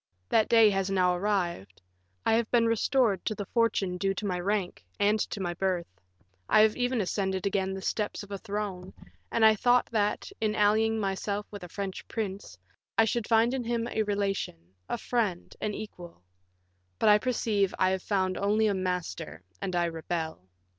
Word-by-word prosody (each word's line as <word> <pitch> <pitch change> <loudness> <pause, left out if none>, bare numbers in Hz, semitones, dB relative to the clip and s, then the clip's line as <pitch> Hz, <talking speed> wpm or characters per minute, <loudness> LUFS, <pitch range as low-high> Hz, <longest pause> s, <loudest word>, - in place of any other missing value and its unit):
That 220 - +3
day 225 -2 +6
has 195 -1 0
now 180 -2 +2
arrived; 175 - -2 0.5
I - - +3
have 225 -1 +2
been 235 -1 +3
restored 230 -2 +2
to 215 - -1
the 205 - -5
fortune 200 -5 +1
due 195 0 0
to 210 - -4
my 180 -3 -1
rank 195 0 -2 0.2
and 210 +2 +3
to - - -5
my 175 -2 -2
birth; 180 -1 -1 0.6
I 215 - +6
have 215 0 +4
even 245 -2 0
ascended 190 0 -1
again 190 -1 0
the 190 - -7
steps 210 0 -2
of 200 - -13
a 200 - -4
throne, 200 -3 -5 0.4
and 225 - +4
I 220 - +8
thought 245 +3 +3
that, 210 - 0
in 215 -1 +1
allying 220 +2 +3
myself 200 +1 -2
with 205 -3 -8
a 180 - -8
French 195 +1 -5
prince, 200 - -5 0.4
I 225 - +6
should 225 0 -1
find 230 +2 +4
in 265 -2 -1
him 235 0 -1
a 220 - 0
relation, 195 - -2 0.2
a - - -1
friend, 215 -7 -2
an 210 -1 -2
equal; 175 - -9 0.7
but - - +1
I 210 0 +7
perceive 210 -5 +1
I 185 0 +3
have 190 0 -1
found 185 -2 0
only 210 +2 +2
a 210 - +2
master, 180 - -3 0.2
and 185 - -2
I 175 0 +2
rebel. 160 - -4
200 Hz, 185 wpm, -28 LUFS, 185-220 Hz, 0.7 s, I